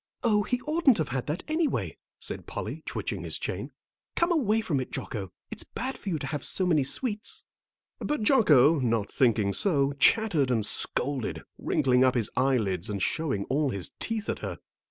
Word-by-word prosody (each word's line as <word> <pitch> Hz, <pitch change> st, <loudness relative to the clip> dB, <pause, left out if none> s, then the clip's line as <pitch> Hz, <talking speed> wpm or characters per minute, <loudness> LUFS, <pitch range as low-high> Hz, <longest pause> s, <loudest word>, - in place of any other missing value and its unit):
"Oh, 210 Hz, -3 st, +3 dB
he 250 Hz, +4 st, -1 dB
oughtn't 305 Hz, -4 st, +3 dB
to 155 Hz, -, +1 dB
have 130 Hz, -1 st, -3 dB
that 150 Hz, +4 st, -3 dB
anyway," 315 Hz, -1 st, -1 dB, 0.2 s
said -, -, -4 dB
Polly, -, -, -5 dB
twitching -, -, -3 dB
his -, -, -1 dB
chain. -, -, -4 dB, 0.4 s
"Come 340 Hz, +1 st, +2 dB
away 225 Hz, -, +2 dB
from 165 Hz, -11 st, -1 dB
it, 130 Hz, -, -4 dB
Jocko, 100 Hz, -7 st, -5 dB, 0.2 s
it's -, -, -3 dB
bad 260 Hz, +3 st, -5 dB
for 200 Hz, -, -7 dB
you 165 Hz, -, 0 dB
to 140 Hz, -, -5 dB
have 145 Hz, 0 st, -4 dB
so 185 Hz, -, 0 dB
many 160 Hz, -5 st, +3 dB
sweets." 210 Hz, -, -2 dB, 0.5 s
But 295 Hz, -7 st, -2 dB
Jocko, 165 Hz, -, +5 dB
not 115 Hz, -5 st, 0 dB
thinking 110 Hz, -7 st, +2 dB
so, 140 Hz, -, +3 dB
chattered 170 Hz, -, +4 dB
and 115 Hz, -4 st, +1 dB
scolded, 130 Hz, +2 st, 0 dB, 0.2 s
wrinkling 125 Hz, -1 st, +2 dB
up 130 Hz, 0 st, +3 dB
his 115 Hz, -4 st, +1 dB
eyelids 110 Hz, -9 st, +1 dB
and 100 Hz, -1 st, -3 dB
showing 130 Hz, -, -1 dB
all 145 Hz, +1 st, 0 dB
his 100 Hz, -6 st, -2 dB
teeth 225 Hz, -2 st, -2 dB
at -, -, -2 dB
her. -, -, -5 dB
145 Hz, 180 wpm, -27 LUFS, -, 0.5 s, Jocko